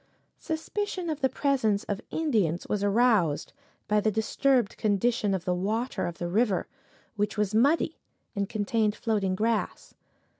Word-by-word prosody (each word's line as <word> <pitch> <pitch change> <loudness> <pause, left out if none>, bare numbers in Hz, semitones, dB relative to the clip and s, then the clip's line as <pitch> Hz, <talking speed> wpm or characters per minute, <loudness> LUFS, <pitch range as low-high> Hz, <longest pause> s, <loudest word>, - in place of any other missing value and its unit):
Suspicion 355 +2 -3
of 305 -1 -5
the 265 - +3
presence 255 -7 +1
of 205 0 -4
Indians 215 - 0
was 205 -1 -1
aroused 205 -7 +2 0.3
by 210 0 +3
the 215 - +2
disturbed 225 +2 +1
condition 210 0 +1
of 185 -1 -5
the 180 - +1
water 215 +7 -1
of 170 - -6
the 175 - -3
river, 200 +1 +1 0.5
which 210 +1 -1
was 210 -1 0
muddy 285 +8 +2 0.4
and 200 0 -1
contained 215 0 0
floating 205 -5 0
grass. 220 +2 -1
215 Hz, 145 wpm, -27 LUFS, 200-250 Hz, 0.5 s, the